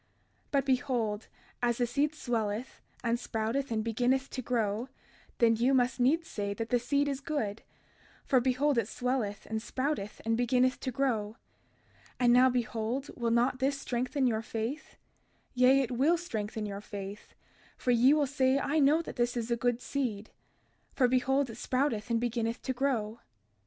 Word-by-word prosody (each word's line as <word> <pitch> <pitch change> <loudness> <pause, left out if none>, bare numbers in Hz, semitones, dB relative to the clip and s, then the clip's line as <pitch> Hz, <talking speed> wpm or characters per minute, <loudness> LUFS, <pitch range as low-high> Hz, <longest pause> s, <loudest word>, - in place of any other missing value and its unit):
32:30 - - -41 0.4
But 275 -2 +1
behold, 245 -5 0 0.3
as 240 -1 +1
the 245 - +2
seed 290 +5 0
swelleth, 230 -2 -3 0.2
and 235 0 +1
sprouteth, 240 +4 -2
and 220 -2 -1
beginneth 250 +4 0
to 255 - -4
grow, 230 0 -1 0.5
then 230 -1 +4
you 250 +4 +2
must 250 0 +2
needs 315 +7 +2
say 200 -1 -3
that 225 +1 -4
the 245 - +3
seed 280 +4 +1
is 275 -2 -2
good; 230 -9 -2 0.6
for 265 - +4
behold 260 +2 +2
it 210 - -1
swelleth, 245 -5 -2
and 220 0 -3
sprouteth, 260 -5 -3
and 225 0 +2
beginneth 250 +2 +2
to 260 - -3
grow. 230 -5 -1 0.8
And 240 -1 +5
now 255 +1 +6
behold, 240 +2 -2
will 235 -1 -1
not 240 +3 +2
this 275 +1 0
strengthen 255 +1 -1
your 225 -3 +1
faith? 230 +6 -5 0.6
Yea, 255 +2 +5
it 255 - -2
will 280 +8 +3
strengthen 220 -9 -4
your 200 -1 -5
faith: 200 0 -8 0.4
for 250 - 0
ye 245 +3 +5
will 300 -2 +2
say 265 -1 +2
I 290 +3 +1
know 300 +4 +4
that - - -8
this 240 0 0
is 235 0 -3
a - - +3
good 245 0 0
seed; 225 -8 -3 0.6
for 255 - +4
behold 265 +2 +2
it 225 - -10
sprouteth 255 -4 -1
and 230 -1 +2
beginneth 235 -1 -2
to 260 - -1
grow. 240 -4 -1
245 Hz, 170 wpm, -30 LUFS, 225-270 Hz, 0.8 s, now